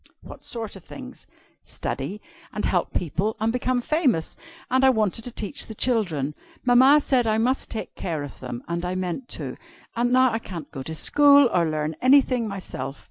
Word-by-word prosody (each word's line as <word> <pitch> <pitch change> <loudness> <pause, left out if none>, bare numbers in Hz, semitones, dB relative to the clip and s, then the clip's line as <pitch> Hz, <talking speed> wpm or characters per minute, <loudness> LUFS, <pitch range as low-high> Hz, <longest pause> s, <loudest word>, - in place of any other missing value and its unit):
"What - - -12
sort 225 -4 -6
of 190 - -12
things?" - - -11 0.4
"Study, 175 +11 -5 0.3
and - - -3
help - - 0
people, 185 +6 -2
and 225 +1 0
become 250 0 0
famous. 260 - 0 0.4
And 260 +1 +3
I 265 - +7
wanted 220 -3 +1
to 245 - -3
teach 230 +5 -3
the 220 - -8
children. 175 - 0 0.3
Mamma 260 +4 +6
said 250 -4 +1
I 215 0 +2
must 250 +4 0
take 220 - -5
care 160 -5 -4
of 145 - -9
them, 125 -2 -6
and 170 +1 -3
I 180 +1 -2
meant 185 +7 -4
to. - - -6 0.4
And 240 +1 +1
now 255 0 +5
I 225 - -1
can't 175 -7 -8
go 135 - -6
to 160 +4 -6
school 285 - +5
or 170 -2 +2
learn 155 0 -2
anything 255 -3 +4
myself. 185 -8 -6
220 Hz, 190 wpm, -24 LUFS, 170-255 Hz, 0.4 s, I